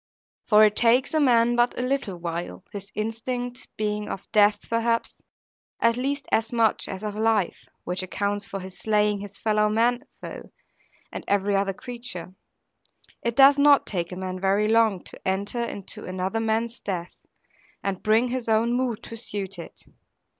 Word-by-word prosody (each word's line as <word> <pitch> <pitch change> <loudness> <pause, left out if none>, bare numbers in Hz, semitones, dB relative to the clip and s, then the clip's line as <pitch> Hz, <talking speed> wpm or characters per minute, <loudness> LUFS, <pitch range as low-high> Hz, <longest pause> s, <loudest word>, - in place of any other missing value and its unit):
For 215 -1 +7
it 210 0 +2
takes 245 +5 +3
a 315 - +3
man 240 -4 +4
but 240 0 +2
a 250 - -1
little 250 -8 -1
while, 170 - -5
his 200 0 -7
instinct 245 +3 -4
being 210 0 -2
of 195 - -5
death 205 0 +4
perhaps, 230 0 0 0.6
at 230 0 +3
least 275 +3 -2
as 225 0 +1
much 230 -3 +2
as 190 +1 -6
of 210 -1 -3
life 220 -3 0 0.2
(which 180 +1 -2
accounts 200 +2 -2
for 195 - -5
his 185 0 -10
slaying 210 -1 +2
his 200 0 -9
fellow 210 -1 +2
men 240 +4 +2
so, - - -10 0.6
and - - -6
every 200 0 +2
other 195 0 +1
creature), 235 -7 -5 0.9
it 235 -1 -1
does 275 +2 +7
not 285 0 +6
take 175 -3 -2
a - - -5
man 185 0 -4
very 195 +3 +2
long 220 -4 +3
to - - -12
enter 200 +5 -1
into 200 -4 -5
another 185 +4 -2
man's 225 +1 -1
death, 180 -3 -5 0.6
and 195 -2 -2
bring 225 +3 +3
his 245 -2 -3
own 225 +2 +3
mood 245 -3 -1
to 230 - -8
suit 200 -4 -4
it. 170 - -10
215 Hz, 170 wpm, -25 LUFS, 195-235 Hz, 0.9 s, For